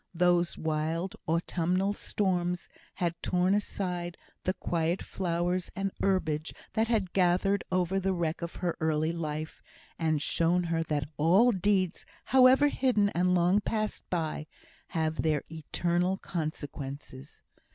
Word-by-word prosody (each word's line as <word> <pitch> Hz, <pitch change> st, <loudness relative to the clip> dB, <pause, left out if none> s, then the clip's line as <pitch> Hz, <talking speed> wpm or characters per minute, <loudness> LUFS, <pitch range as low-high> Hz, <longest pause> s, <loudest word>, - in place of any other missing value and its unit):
Those 175 Hz, 0 st, +2 dB
wild 160 Hz, +3 st, -1 dB
autumnal 175 Hz, +4 st, +1 dB
storms 180 Hz, -4 st, -1 dB, 0.3 s
had 175 Hz, -2 st, 0 dB
torn 180 Hz, +1 st, +2 dB
aside 180 Hz, -4 st, -2 dB, 0.3 s
the 185 Hz, -, +1 dB
quiet 170 Hz, +1 st, -1 dB
flowers 180 Hz, 0 st, -1 dB
and 195 Hz, 0 st, -1 dB
herbage 160 Hz, -5 st, 0 dB, 0.2 s
that 220 Hz, +1 st, +2 dB
had 210 Hz, -6 st, 0 dB
gathered 190 Hz, +2 st, +2 dB
over 185 Hz, +1 st, +1 dB
the 195 Hz, 0 st, 0 dB
wreck 170 Hz, -3 st, -1 dB
of 170 Hz, 0 st, -5 dB
her 175 Hz, -2 st, -2 dB
early 155 Hz, 0 st, +1 dB
life, 155 Hz, -1 st, -4 dB, 0.4 s
and 160 Hz, -2 st, +1 dB
shown 170 Hz, +4 st, +2 dB
her 165 Hz, -1 st, 0 dB
that 150 Hz, -3 st, -1 dB
all 185 Hz, +11 st, +5 dB
deeds, 190 Hz, -2 st, 0 dB, 0.2 s
however 260 Hz, +3 st, +6 dB
hidden 235 Hz, -8 st, +2 dB
and 180 Hz, 0 st, +2 dB
long 180 Hz, +3 st, +4 dB
passed 215 Hz, 0 st, -2 dB
by, 160 Hz, -3 st, -2 dB, 0.4 s
have 160 Hz, -2 st, -1 dB
their 155 Hz, -2 st, +1 dB
eternal 175 Hz, +3 st, 0 dB
consequences. 145 Hz, -5 st, -6 dB
175 Hz, 130 wpm, -29 LUFS, 160-190 Hz, 0.4 s, however